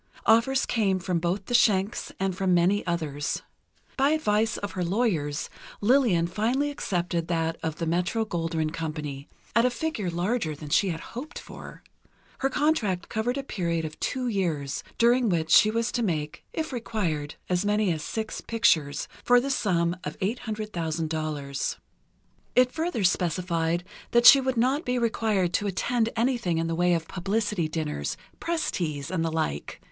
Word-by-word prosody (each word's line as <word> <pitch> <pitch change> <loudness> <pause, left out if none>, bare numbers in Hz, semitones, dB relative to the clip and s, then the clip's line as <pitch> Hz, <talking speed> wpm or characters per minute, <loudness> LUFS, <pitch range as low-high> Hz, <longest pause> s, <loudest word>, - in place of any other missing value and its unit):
Offers 240 +4 +4
came 205 -5 +1
from 180 -2 -1
both 180 +3 -1
the - - -5
Schencks, 205 -3 +2
and 190 -1 0
from 185 -1 +2
many 185 +4 +3
others. 155 -4 -2 0.5
By 275 +1 +4
advice 225 -8 +1
of 205 - -4
her 180 - -2
lawyers, 170 -7 0 0.3
Lillian 220 -7 +3
finally 240 +10 0
accepted 175 - -2
that 165 -1 0
of 160 -2 -2
the 165 - -3
Metro 180 +7 0
Goldwyn 165 -4 -1
Company, 150 -3 -5 0.3
at 230 - +5
a 250 - +4
figure 245 - -2
larger 175 -1 -1
than 150 0 -9
she 195 +6 +3
had 165 -2 -3
hoped 270 +8 -6
for. - - -10 0.6
Her 270 - +1
contract 245 - 0
covered 240 +4 -1
a 275 - -2
period 170 -9 -2
of 155 0 -7
two 255 -2 -1
years, 165 - -1
during 240 0 +4
which 160 -3 0
she 215 - +7
was 230 +2 0
to 240 - -1
make, 155 -8 -2
if 315 -3 -3
required, 175 -11 -2
as 180 +1 +1
many 205 -3 +2
as 155 - -5
six 220 +7 -4
pictures, 155 -11 +2 0.2
for 245 0 +6
the 275 +3 -2
sum 175 -8 +1
of 150 - -5
$800,000. 160 - -3 0.8
It 250 0 +5
further 320 - -2
specified 175 -1 +1 0.3
that 240 0 +4
she 275 - +10
would 260 -1 -1
not 265 +6 +2
be 250 0 0
required 220 -6 +1
to 205 - +1
attend 225 +4 0
anything 230 -8 +1
in 165 - 0
the 165 - -1
way 175 +1 +3
of 165 -1 -3
publicity 200 -1 -1
dinners, 155 -1 -3 0.2
press 335 -1 -1
teas, 155 -3 -3
and 175 -3 0
the 165 - -1
like. 75 - -2
185 Hz, 165 wpm, -27 LUFS, 165-230 Hz, 0.8 s, she